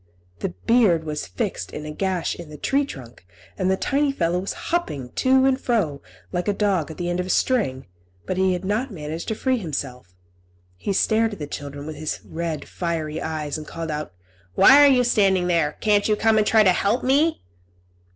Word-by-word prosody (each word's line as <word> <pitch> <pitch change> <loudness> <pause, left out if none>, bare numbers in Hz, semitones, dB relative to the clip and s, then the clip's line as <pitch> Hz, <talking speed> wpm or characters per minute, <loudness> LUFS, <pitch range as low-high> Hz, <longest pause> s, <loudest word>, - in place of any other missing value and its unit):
The - - -2 0.2
beard 210 -9 +4
was 150 -5 -4
fixed 90 0 -4
in 150 - -7
a 150 - -5
gash 185 +1 -1
in 170 -3 -10
the 150 - -9
tree 275 - +1
trunk, 125 - -11 0.3
and 185 -1 0
the 190 - +2
tiny 280 +5 +1
fellow 175 -8 0
was 190 - -3 0.2
hopping 140 - -2
to 260 0 +4
and 270 0 +2
fro, 180 - 0 0.3
like 180 +1 -2
a 205 - +2
dog 195 -7 0
at 160 - -9
the 175 - -3
end 175 +1 -1
of 180 - -2
a - - -7
string, 185 - +1 0.4
but 185 - -2
he 190 0 +2
could 180 +1 -4
not 215 +7 -1
manage 160 -4 -6
to 220 - -1
free 260 +3 0
himself. 130 - -6 0.6
He 90 - -4
stared 220 +3 +2
at - - -7
the 150 - -5
children, 145 0 -7
with 155 -1 -7
his 155 0 -3
red, 160 -2 -4
fiery 160 -3 -3
eyes, 155 -2 -3
and 155 - -10
called 165 -1 -5
out, 150 0 -4 0.4
"Why 285 - +8
are - - +8
you 250 -1 +4
standing 195 -6 +3
there? 165 -4 +1
Can't 205 -1 +3
you 215 - +3
come 220 +1 +3
and 210 - +1
try 220 -1 +5
to 185 -3 +5
help 205 +7 0
me?" 290 +5 +2
180 Hz, 210 wpm, -23 LUFS, 150-220 Hz, 0.6 s, Why